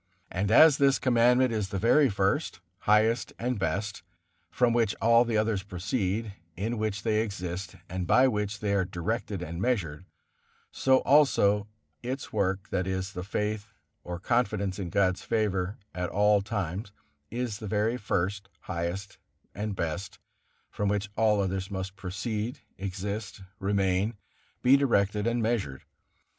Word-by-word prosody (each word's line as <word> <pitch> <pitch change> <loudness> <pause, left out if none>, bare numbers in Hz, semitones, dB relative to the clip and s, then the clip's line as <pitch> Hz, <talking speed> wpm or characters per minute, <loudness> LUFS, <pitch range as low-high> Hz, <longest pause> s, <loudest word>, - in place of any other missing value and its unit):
And 95 +3 -1
as 150 +6 +7
this 140 -1 +4
Commandment 125 0 +3
is 105 -3 -1
the 100 - -3
very 130 +8 +4
first, 100 +10 0 0.3
highest 110 +3 +3
and 125 -1 -2
best, 100 +1 -2 0.5
from 120 -2 +2
which 115 -3 +2
all 115 +1 +5
the 115 -2 0
others 105 -2 +1
proceed, 100 +2 -2 0.2
in 110 +4 -2
which 105 -1 -2
they 110 -1 +2
exist, 90 -4 -5
and 90 -1 -4
by 130 +1 +5
which 105 -3 -2
they 105 -1 0
are 100 -2 +2
directed 95 +2 -3
and 85 +2 -5
measured, 95 -9 -1 0.7
so 130 -1 +3
also 105 -8 +4 0.3
its 130 +3 -5
work, 95 -1 0
that 95 0 -1
is, 95 0 -3
the 90 - -5
faith 105 +2 -2 0.4
or 90 -1 -5
confidence 100 -3 0
in 90 -3 -3
God's 95 0 +1
favor 100 -4 -1 0.2
at 90 -1 -2
all 105 0 +3
times, 100 -1 -3 0.4
is 120 -3 -3
the 110 - -6
very 110 +3 +1
first, 100 -2 -2
highest 90 +3 -4 0.3
and 105 -1 -3
best, 90 +2 -4 0.5
from 105 -1 -1
which 105 0 -1
all 110 -2 +3
others 95 0 -1
must 95 -1 -5
proceed, 105 +5 -4
exist, 100 +1 -5 0.2
remain, 100 +2 +1 0.5
be 130 +2 +7
directed 105 -6 +2
and 120 0 +1
measured. 105 - -1
105 Hz, 145 wpm, -28 LUFS, 95-115 Hz, 0.7 s, as